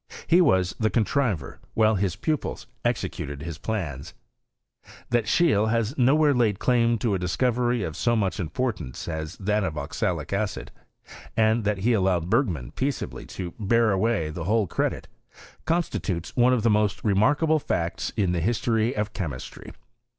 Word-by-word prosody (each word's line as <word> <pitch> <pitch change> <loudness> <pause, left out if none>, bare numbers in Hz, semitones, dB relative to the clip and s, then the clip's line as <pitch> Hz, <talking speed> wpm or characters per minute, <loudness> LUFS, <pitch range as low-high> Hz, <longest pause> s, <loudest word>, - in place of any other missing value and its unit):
He 175 +2 +5
was 95 - +2
the 110 -1 +2
contriver, 110 - 0 0.2
while 110 0 +4
his 95 -3 0
pupils 155 -2 -2 0.2
executed 70 0 -3
his 85 -2 -6
plans. 85 - -4 1.0
That 120 -3 +2
Scheele 115 -7 +3
has 115 +3 0
nowhere 145 +3 +4
laid 115 -6 +2
claim 120 0 +2
to 110 -1 0
a 95 - 0
discovery 120 +6 0
of 80 - -4
so 120 +6 +1
much 95 -6 0
importance 95 - -3
as 80 +1 -4
that 105 +2 0
of 80 -5 -3
oxalic 80 +1 -2
acid, 100 +1 -2 0.7
and 110 0 +3
that 105 -1 +1
he 120 - +4
allow 95 -4 +2
ed 85 +1 -5
Ber§;man 100 - 0
peaceably 135 0 -3
to 90 -3 -6
bear 115 +2 +3
away 95 -5 +1
the 80 +1 -5
whole 110 +2 +2
credit, - - -2 0.6
constitutes 115 - -2
one 125 0 +4
of 125 -4 +1
the 115 - +4
most 105 -1 +1
remarkable 145 +10 +3
facts 85 - -2
in 95 -4 +2
the 85 -2 0
history 115 +3 +1
of 105 0 -2
chemistry. 75 -10 -6
105 Hz, 160 wpm, -25 LUFS, 90-120 Hz, 1.0 s, He